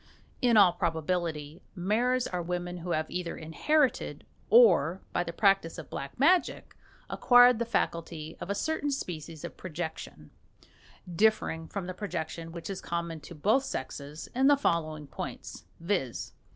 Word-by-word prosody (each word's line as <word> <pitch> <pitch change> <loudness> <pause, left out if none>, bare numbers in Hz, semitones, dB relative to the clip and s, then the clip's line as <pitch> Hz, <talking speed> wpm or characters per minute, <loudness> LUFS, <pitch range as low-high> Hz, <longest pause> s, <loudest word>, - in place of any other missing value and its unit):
In 240 -3 +4
all 190 -4 +7
probability 165 -2 -2
maras 235 +7 +1
are 180 -1 -3
women 175 +1 -3
who 175 +1 -7
have 155 -2 0
either 175 -1 -4
inherited 205 - 0 0.2
or, 190 - +5
by 175 - +1
the 170 - -5
practice 195 -2 +2
of 165 - -9
Black 140 +6 -6
Magic, 345 +6 +2 0.3
acquired 245 -1 +6
the 235 - 0
faculty 165 -6 -2
of - - -6
a 200 - 0
certain 295 +6 -1
species 165 - -5
of - - -7
projection 160 -2 -7 0.8
differing 185 -5 +2
from 200 -3 -5
the 185 - -5
projection 165 -4 -5
which 170 0 -7
is 195 -2 -5
common 170 -1 -3
to 170 - -11
both 215 - +2
sexes 145 - -6
in 265 +2 +3
the 290 0 +6
following 155 - -1
points, 110 - -7
viz. 170 - -2
175 Hz, 150 wpm, -29 LUFS, 160-215 Hz, 0.8 s, all